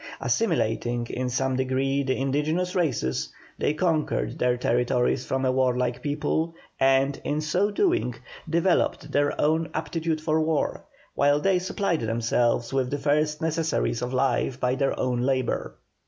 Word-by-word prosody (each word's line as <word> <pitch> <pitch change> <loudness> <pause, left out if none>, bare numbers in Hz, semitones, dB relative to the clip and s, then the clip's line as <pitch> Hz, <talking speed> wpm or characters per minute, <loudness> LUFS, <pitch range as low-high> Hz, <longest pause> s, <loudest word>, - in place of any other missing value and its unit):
Assimilating 120 - 0
in 130 0 -2
some 130 +1 0
degree 130 +1 0
the 130 -1 -1
indigenous 150 +7 0
races, 65 - -1 0.3
they 150 - +1
conquered 160 -2 0
their 125 0 +2
territories 125 +1 +1
from 135 0 0
a 130 - +3
warlike 125 -1 +1
people, 155 +3 -1 0.2
and, 135 +1 +3
in 150 +1 -1
so 175 +7 +1
doing, 280 - +1 0.3
developed 170 +2 +1
their 145 0 +1
own 160 +2 +2
aptitude 160 0 -2
for 155 0 +1
war, 155 -1 0 0.3
while 145 +1 +3
they 190 +3 +2
supplied 185 -2 -1
themselves 115 +2 0
with 130 -2 +1
the 145 - -1
first 150 +2 0
necessaries 160 -7 0
of 125 0 -3
life 130 0 0
by 125 -1 +1
their 135 +1 0
own 125 -1 0
labour. 130 -1 -1
135 Hz, 145 wpm, -25 LUFS, 125-160 Hz, 0.3 s, a